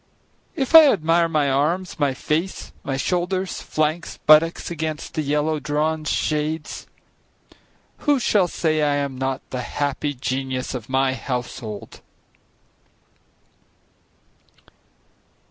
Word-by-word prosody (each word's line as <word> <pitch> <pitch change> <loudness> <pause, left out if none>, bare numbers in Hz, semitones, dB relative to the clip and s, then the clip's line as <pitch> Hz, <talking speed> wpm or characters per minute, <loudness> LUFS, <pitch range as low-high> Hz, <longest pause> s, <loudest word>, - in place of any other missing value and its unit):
If 265 +1 -2
I 315 -3 +10
admire 165 -2 +2
my 155 -3 +1
arms, 165 +7 0
my 140 -3 +1
face, 160 +8 -2
my 135 -1 -2
shoulders, 180 +4 -1
flanks, 155 +3 -2
buttocks 160 +3 +5
against 155 -2 -4
the 155 - -1
yellow 150 +1 0
drawn 155 +1 -1
shades, 155 +1 -2 1.1
Who 290 -2 +2
shall 205 -5 +3
say 155 -3 0
I 145 -1 +2
am 140 -2 -2
not 130 0 -3
the 125 - -3
happy 145 +2 -2
genius 130 0 -3
of 125 -1 -6
my 130 0 +2
household? 120 -5 -6
150 Hz, 110 wpm, -22 LUFS, 135-165 Hz, 1.1 s, I